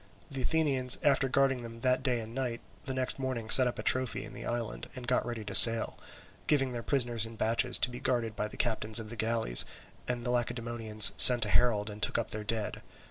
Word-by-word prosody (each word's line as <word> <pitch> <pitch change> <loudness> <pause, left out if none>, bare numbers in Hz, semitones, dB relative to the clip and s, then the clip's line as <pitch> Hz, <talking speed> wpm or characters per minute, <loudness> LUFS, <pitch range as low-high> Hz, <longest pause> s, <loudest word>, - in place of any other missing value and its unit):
The 135 -1 -7
Athenians, 135 -3 -2
after 135 -2 -2
guarding 135 -1 -3
them 115 0 -14
that 130 0 -3
day 125 -3 -5
and 110 +1 -14
night, 125 -2 -8 0.3
the 130 - -7
next 130 +1 -5
morning 125 -4 -8
set 130 -1 +3
up 120 - -8
a - - -10
trophy 130 -1 -4
in - - -16
the - - -12
island, 120 -2 -9
and 125 -1 -12
got 125 +1 -4
ready 115 -3 -10
to 100 - -10
sail, 115 +1 +8 0.5
giving 135 -4 -3
their 120 -1 -9
prisoners 120 -4 -4
in 115 0 -9
batches 110 +1 -2
to 125 - -4
be 125 - -12
guarded 120 -5 -6
by 105 - -7
the - - -17
captains 110 -2 -1
of 110 -1 -12
the - - -11
galleys; 110 - +1 0.4
and 125 -1 -7
the 120 - -6
Lacedaemonians 115 -3 +1
sent 120 -3 +11
a - - -8
herald 105 -2 -3
and 105 +1 -15
took - - -3
up 115 - -8
their 110 0 -9
dead. 110 -1 -7
120 Hz, 225 wpm, -25 LUFS, 115-130 Hz, 0.5 s, sent